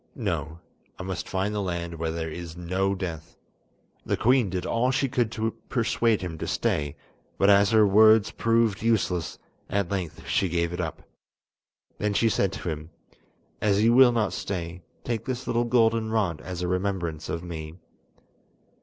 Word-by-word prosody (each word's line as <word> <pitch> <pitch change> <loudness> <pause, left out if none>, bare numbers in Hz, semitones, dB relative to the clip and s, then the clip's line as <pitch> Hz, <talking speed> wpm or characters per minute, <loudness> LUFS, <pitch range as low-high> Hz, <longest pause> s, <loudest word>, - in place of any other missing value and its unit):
No, 80 +1 -3 0.4
I - - -6
must 95 0 -5
find 95 +2 -1
the 105 - -1
land 85 -3 -4
where 80 0 -1
there 80 0 -3
is 85 +1 -7
no 95 +3 0
death." 85 -4 -6 0.7
The - - -1
queen 125 -3 +3
did 90 0 -3
all 120 +2 +1
she 135 +1 +1
could 120 -3 0
to 110 0 -1 0.2
persuade 115 -2 +1
him 80 -3 -5
to - - -4
stay, 75 -1 -1 0.4
but 100 +1 +5
as 100 0 +5
her 110 -1 +5
words 110 +1 +6
proved 115 -3 +1
useless, 95 -7 0 0.3
at 100 -2 -1
length 95 -5 -4
she 95 - +1
gave 85 0 0
it 90 - -2
up. 80 -2 -5 1.0
Then 105 0 0
she 115 - +3
said 100 -3 +1
to 90 - -4
him: 80 0 -5 0.7
"As 105 0 +2
you 115 +1 +5
will 130 0 +7
not 110 -4 0
stay, 90 -2 -4 0.2
take 115 -3 -3
this 130 0 -4
little 120 +1 +1
golden 115 -2 +2
rod 100 -8 0
as 90 -1 -5
a - - -1
remembrance 90 -4 -2
of 85 - -3
me. 80 -2 -7
95 Hz, 170 wpm, -26 LUFS, 85-110 Hz, 1.0 s, will